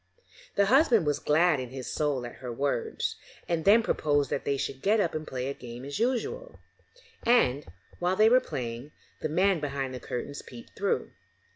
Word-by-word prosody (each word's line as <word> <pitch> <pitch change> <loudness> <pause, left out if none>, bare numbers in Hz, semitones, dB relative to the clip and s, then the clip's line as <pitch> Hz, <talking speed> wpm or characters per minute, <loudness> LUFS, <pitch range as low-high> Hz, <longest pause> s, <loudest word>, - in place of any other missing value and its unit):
The 200 - +4
husband 240 - +4
was 145 -1 +1
glad 155 0 +3
in 125 -1 -5
his 130 0 -7
soul 145 -5 -1
at 120 - -9
her 125 -2 -6
words, 135 0 -2 0.3
and 165 -2 -1
then 220 +3 +6
proposed 145 -7 +1
that - - -2
they 140 - +1
should 135 0 -4
get 215 +3 +3
up 175 -5 +1
and 155 0 -4
play 130 0 -3
a 140 - -2
game 120 0 -9
as 140 +5 -5
usual; 260 - -1 0.6
and, 145 - +3 0.3
while 180 +1 +1
they 215 +3 +5
were 250 +3 +6
playing, 125 - -6 0.3
the - - -1
man 185 +3 +3
behind 140 -3 -3
the 125 - -5
curtains 140 +4 -5
peeped 120 -2 -13
through. 200 0 -1
150 Hz, 185 wpm, -28 LUFS, 130-200 Hz, 0.6 s, then